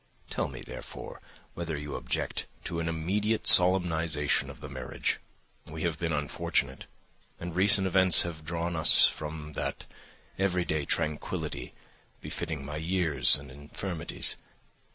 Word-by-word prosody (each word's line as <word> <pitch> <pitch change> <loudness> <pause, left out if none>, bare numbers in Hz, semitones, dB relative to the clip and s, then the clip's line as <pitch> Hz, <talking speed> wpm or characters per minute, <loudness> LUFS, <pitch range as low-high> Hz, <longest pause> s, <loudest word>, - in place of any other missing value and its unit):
Tell - - -1
me, - - -9
therefore, - - -9 0.3
whether 85 -3 -4
you 75 0 -7
object - - -3 0.2
to 85 - -4
an 80 0 -2
immediate 100 +7 -1
solemnisation 85 -5 +4
of - - -11
the 75 - -8
marriage. 65 -2 -3 0.5
We 80 0 -7
have 85 -3 -2
been 85 -1 -2
unfortunate, 75 -2 -2 0.5
and 85 -1 -6
recent 95 +1 +6
events 95 -2 +6
have 80 -2 -7
drawn 85 +2 -3
us 80 -2 +6
from 75 0 -4
that - - -4 0.6
everyday 90 -6 0
tranquillity 75 +1 -3 0.4
befitting 75 -4 -6
my 75 +2 -6
years 80 -5 +3
and 70 -1 -7
infirmities. 75 +4 -2
80 Hz, 130 wpm, -28 LUFS, 75-90 Hz, 0.6 s, recent